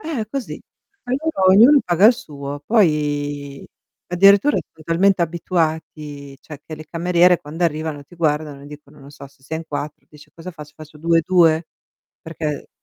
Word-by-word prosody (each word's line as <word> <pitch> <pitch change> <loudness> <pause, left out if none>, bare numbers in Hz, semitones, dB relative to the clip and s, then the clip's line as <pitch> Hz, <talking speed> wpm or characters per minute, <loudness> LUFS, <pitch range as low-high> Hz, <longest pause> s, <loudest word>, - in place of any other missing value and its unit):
Eh, 300 -9 -4
così 275 -3 -5 0.5
ognuno 295 +6 -2 0.4
ognuno 290 -2 +6
paga 180 +4 +4
il 240 - +7
suo, 145 -8 -8
poi 145 -8 0 0.4
addirittura 200 +9 +4 0.2
son 155 -1 -18
talmente 180 +2 +2
abituati, 155 -4 -3
cioè 150 -3 -11
che 155 - -8
le 155 - -10
cameriere 175 +1 +2
quando 160 +4 -4
arrivano 155 -2 -3
ti 175 - -18
guardano 150 -3 -2
e 145 - -12
dicono, 150 0 -14
non 140 - -14
so, 145 -1 -12
se 135 -1 -25
sei 160 +4 -5
in 165 - -8
4, 150 0 -6
dice: 150 -1 -18
"Cosa 170 +2 -10
faccio? 150 -2 -12
Faccio 155 -1 -13
2 165 +1 +2
e - - +1
2?" 165 -3 +3 0.5
Perché 155 -3 -5
160 Hz, 170 wpm, -20 LUFS, 145-175 Hz, 0.5 s, il